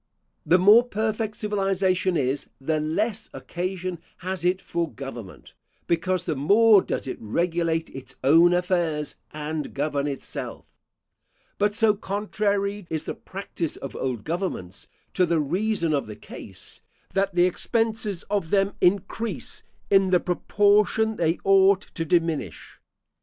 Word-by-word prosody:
The 180 Hz, -, +6 dB
more 205 Hz, +6 st, +7 dB
perfect 220 Hz, -2 st, -2 dB
civilisation 195 Hz, -3 st, +1 dB
is, 135 Hz, 0 st, -1 dB
the 155 Hz, +3 st, 0 dB
less 210 Hz, +8 st, -1 dB
occasion 180 Hz, 0 st, -4 dB, 0.3 s
has 185 Hz, -1 st, -3 dB
it 180 Hz, +1 st, +2 dB
for 170 Hz, -4 st, -3 dB
government, 125 Hz, -7 st, -9 dB, 0.3 s
because 175 Hz, +2 st, 0 dB
the 160 Hz, -, -1 dB
more 205 Hz, +9 st, +6 dB
does -, -, -3 dB
it -, -, -5 dB
regulate 165 Hz, +7 st, -1 dB
its 135 Hz, -1 st, -10 dB
own 165 Hz, +6 st, +6 dB
affairs, 175 Hz, -4 st, 0 dB
and 150 Hz, 0 st, -5 dB
govern 145 Hz, 0 st, -1 dB
itself; 140 Hz, -2 st, -5 dB, 0.9 s
but 205 Hz, 0 st, +2 dB
so 225 Hz, -2 st, +4 dB
contrary 205 Hz, -1 st, -2 dB
is 160 Hz, -1 st, -2 dB
the -, -, -4 dB
practice 185 Hz, -4 st, -5 dB
of 135 Hz, -, -8 dB
old 125 Hz, -5 st, -3 dB
governments 160 Hz, -, -4 dB, 0.3 s
to 180 Hz, -1 st, +2 dB
the 165 Hz, -1 st, +2 dB
reason 170 Hz, +2 st, 0 dB
of 140 Hz, -5 st, 0 dB
the 105 Hz, -, -7 dB
case, -, -, -10 dB, 0.3 s
that 195 Hz, -1 st, 0 dB
the 175 Hz, 0 st, +5 dB
expenses 215 Hz, 0 st, -1 dB
of 200 Hz, -5 st, -2 dB
them 195 Hz, +1 st, +2 dB
increase 200 Hz, +5 st, 0 dB, 0.3 s
in 195 Hz, -1 st, +5 dB
the 185 Hz, -1 st, +4 dB
proportion 205 Hz, +4 st, +2 dB
they 165 Hz, 0 st, +1 dB
ought 195 Hz, 0 st, +5 dB
to 165 Hz, -, -3 dB
diminish. 165 Hz, -, -1 dB
180 Hz, 135 wpm, -25 LUFS, 160-200 Hz, 0.9 s, more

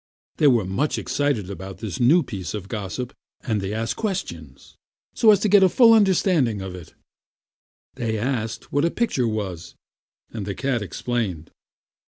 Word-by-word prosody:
They 150 Hz, -, +4 dB
were 120 Hz, -7 st, +4 dB
much 115 Hz, +11 st, -1 dB
excited 130 Hz, -10 st, -1 dB
about 95 Hz, 0 st, -8 dB
this 105 Hz, -7 st, -6 dB
new 155 Hz, +8 st, +5 dB
piece 95 Hz, -, -6 dB
of 100 Hz, -2 st, -6 dB
gossip, 110 Hz, +4 st, -5 dB, 0.3 s
and 110 Hz, -5 st, -1 dB
they 95 Hz, +1 st, -3 dB
asked 115 Hz, +1 st, -2 dB
questions, 85 Hz, -, -5 dB, 0.4 s
so 225 Hz, -, +4 dB
as 205 Hz, -3 st, +7 dB
to 215 Hz, -, +2 dB
get 205 Hz, 0 st, +6 dB
at 190 Hz, -, +7 dB
a -, -, -1 dB
full 230 Hz, +3 st, +6 dB
understanding 180 Hz, -, +3 dB
of 95 Hz, -1 st, -6 dB
it. 90 Hz, -3 st, -11 dB, 1.0 s
They 115 Hz, -4 st, -2 dB
asked 115 Hz, -1 st, -3 dB
what 145 Hz, -, +2 dB
a 170 Hz, -, +3 dB
picture 165 Hz, -, 0 dB
was, 95 Hz, -6 st, -4 dB, 0.6 s
and 105 Hz, -4 st, -5 dB
the 100 Hz, -, -3 dB
cat 135 Hz, -4 st, -1 dB
explained. 105 Hz, -6 st, -3 dB
115 Hz, 170 wpm, -23 LUFS, 95-145 Hz, 1.0 s, as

